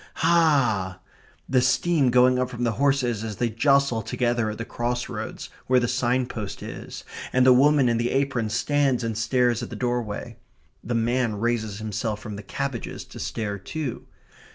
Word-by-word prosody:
Hah!" 140 - +2 0.5
the 130 -1 +3
steam 140 +2 +2
going 125 +1 +4
up 125 0 0
from 120 -1 -4
the 120 - +2
horses 130 -6 +2
as 110 -2 -4
they 120 +2 -1
jostle 140 0 +3
together 120 0 0
at 105 - -5
the 115 - -5
cross 120 +1 -2
roads, 110 -2 -6 0.2
where 130 0 +4
the 120 - 0
signpost 125 -4 -1
is, - - -8 0.3
and 130 0 +3
the 130 - +8
woman 140 +1 +5
in 115 -1 +2
the 120 +1 0
apron 130 -5 0
stands 135 +2 +1
and 115 -1 -2
stares 120 +1 +1
at - - -5
the - - -7
doorway. 120 -4 -3 0.5
The 120 +2 -2
man 115 0 +1
raises 110 -3 -1
himself 110 0 -3
from 105 -1 -7
the 100 - -7
cabbages 135 +4 -4
to - - -11
stare 105 -3 -3
too. 140 +5 -5
120 Hz, 175 wpm, -25 LUFS, 110-130 Hz, 0.5 s, the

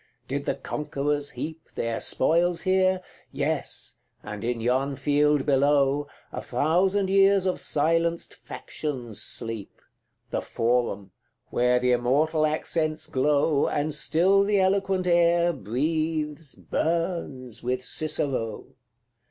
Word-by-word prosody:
Did - - -3
the - - 0
Conquerors 145 -1 -2
heap 160 0 -7
Their 115 -1 -2
spoils 170 +5 +2
here? 185 0 +2 0.3
Yes; - - -2 0.3
and 105 0 -7
in 120 0 -1
yon 130 +4 0
field 145 0 +2
below, 140 0 +3 0.2
A - - -5
thousand 185 +9 +1
years 195 -1 +5
of 185 - 0
silenced 165 +3 0
factions 125 -8 -6
sleep 115 -4 -5 0.5
The - - -1
Forum, 115 -5 -1 0.4
where 125 0 +3
the 125 0 +2
immortal 150 +6 +2
accents 155 0 -1
glow, 145 +2 +2
And 150 +1 -1
still 175 +7 +3
the 205 0 +2
eloquent 190 -1 +1
air 170 0 +3
breathes 150 - -2
burns 160 - -2
with 125 +1 -2
Cicero! 140 -9 -2
150 Hz, 110 wpm, -26 LUFS, 130-170 Hz, 0.5 s, years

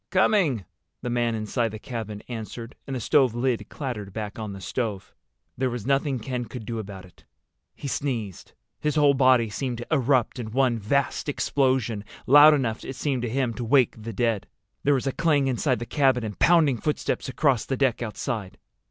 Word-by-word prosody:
"Coming," 185 - +2 0.4
the 120 - -2
man 120 -1 +1
inside 110 +2 -1
the 110 - -7
cabin 110 -3 -6
answered, 115 +1 -7
and 135 - -3
the - - -2
stove 130 0 +3
lid 120 -4 -1
clattered 115 -9 -5
back 105 0 -5
on 110 -2 -4
the 100 - -8
stove. 100 +1 -4 0.4
There 130 +1 0
was 120 -3 -5
nothing 135 0 +1
Ken 125 +1 -4
could 115 0 -8
do 115 +1 -4
about 95 -3 -8
it. 90 - -20 0.5
He - - -6
sneezed. 115 -7 -3 0.3
His 150 -1 -1
whole 145 -2 +5
body 130 -3 +4
seemed 120 +3 -3
to 120 - -7
erupt 130 -3 +2
in 115 -3 -4
one 125 -3 +2
vast 140 +7 0
explosion, 130 -7 0 0.2
loud 145 +3 +8
enough—it 130 -1 -3
seemed 135 -2 -1
to 120 - -2
him—to 125 -1 -1
wake 125 +1 +4
the 110 +1 -7
dead. 115 -2 0 0.3
There 145 0 +3
was 130 - -2
a 135 - +1
clang 155 -3 +2
inside 130 0 +1
the 120 - -5
cabin 130 -2 +2
and 105 -2 -6
pounding 160 -7 +4
footsteps 150 +1 -2
across 130 -3 +1
the 135 - -2
deck 130 -4 +1
outside. 110 -3 -4
125 Hz, 185 wpm, -25 LUFS, 110-135 Hz, 0.5 s, loud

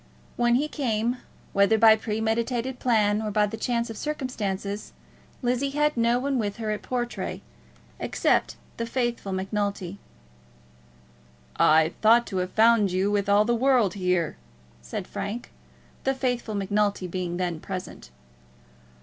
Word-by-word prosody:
When 240 0 +3
he 290 +4 +1
came, 240 -4 -1 0.4
whether 200 +3 +4
by 220 0 +7
premeditated 230 +3 -2
plan 215 -3 +2
or 215 - -2
by 210 0 +2
the 210 +2 -5
chance 235 +1 -1
of 225 - -7
circumstances, 210 -9 -4 0.5
Lizzie 250 +3 +1
had 300 0 +2
no 235 0 +3
one 270 0 0
with 205 -2 -2
her 220 -2 -2
at 210 - -3
Portray, 240 -1 -3 0.6
except - - +1 0.2
the 230 - -3
faithful 240 -4 -2
Macnulty. 195 0 -2 1.6
"I 160 +1 +4
thought 230 +2 +6
to - - 0
have 180 0 -1
found 220 -3 +4
you 190 +3 +1
with 205 -1 0
all 205 +1 +5
the 240 - +2
world 245 -4 +3
here," 180 - 0 0.4
said - - -5
Frank, 225 +4 -5 0.5
the 270 0 +1
faithful 245 -4 -2
Macnulty 205 0 0
being 180 -1 -3
then 175 -3 -2
present. 185 - -7
220 Hz, 140 wpm, -26 LUFS, 200-240 Hz, 1.6 s, by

